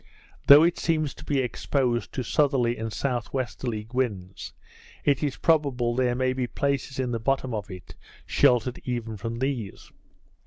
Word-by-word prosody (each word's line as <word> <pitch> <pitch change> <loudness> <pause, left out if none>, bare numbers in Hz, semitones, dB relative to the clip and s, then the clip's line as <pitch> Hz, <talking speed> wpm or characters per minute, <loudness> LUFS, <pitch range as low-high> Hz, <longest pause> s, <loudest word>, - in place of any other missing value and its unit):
Though 145 +2 +10
it 170 +1 +2
seems 155 -3 0
to - - -13
be 140 -2 0
exposed 125 -1 -1
to 130 - -2
southerly 130 -2 +2
and 110 -1 -4
S.W. 120 -2 -3
winds, 95 -8 -3 0.5
it 140 -2 +2
is 145 -3 -1
probable 140 -7 +2
there 125 0 +1
may 130 0 +1
be 130 -1 -2
places 140 0 -2
in 130 -2 -1
the 115 - -1
bottom 130 +1 0
of 105 -1 -4
it 90 -2 -10 0.3
sheltered 125 0 +2
even 120 -3 -3
from 115 +3 -5
these. 125 -5 -4
125 Hz, 155 wpm, -26 LUFS, 115-135 Hz, 0.5 s, Though